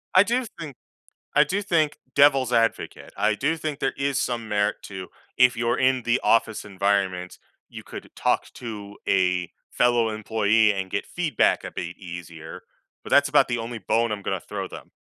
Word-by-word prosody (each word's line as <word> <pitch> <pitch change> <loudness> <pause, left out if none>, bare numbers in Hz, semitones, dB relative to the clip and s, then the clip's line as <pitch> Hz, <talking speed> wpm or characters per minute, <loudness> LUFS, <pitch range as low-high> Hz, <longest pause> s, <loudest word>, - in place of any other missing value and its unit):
I 185 - +8
do 245 +5 0
think 150 -5 -7 0.6
I 150 - +6
do 195 +7 -2
think, 160 -6 +1 0.2
devil's 135 -3 +5
advocate, 115 -1 0
I 110 - +2
do 150 +8 0
think 155 -2 -4
there 135 - -1
is 140 0 0
some 115 -3 -2
merit 105 0 +1
to, 95 -2 -7 0.3
if 125 -1 +5
you're 115 +1 0
in 130 -1 +2
the 120 +2 +1
office 110 -1 +2
environment, 95 -2 -1 0.3
you - - -9
could - - -10
talk - - 0
to 105 -4 -8
a 90 -2 +2 0.2
fellow 120 -2 +2
employee 110 0 +2
and 95 -1 -4
get - - -2
feedback 160 -8 +1
a - - -5
bit 85 0 -6
easier, 85 -3 -9 0.4
but - - -10
that's 145 0 +5
about 145 -3 +4
the 120 - 0
only 115 +1 -5
bone 110 +2 +1
I'm 105 - -4
gonna - - -2
throw - - -6
them. - - -11
115 Hz, 180 wpm, -24 LUFS, 100-135 Hz, 0.6 s, I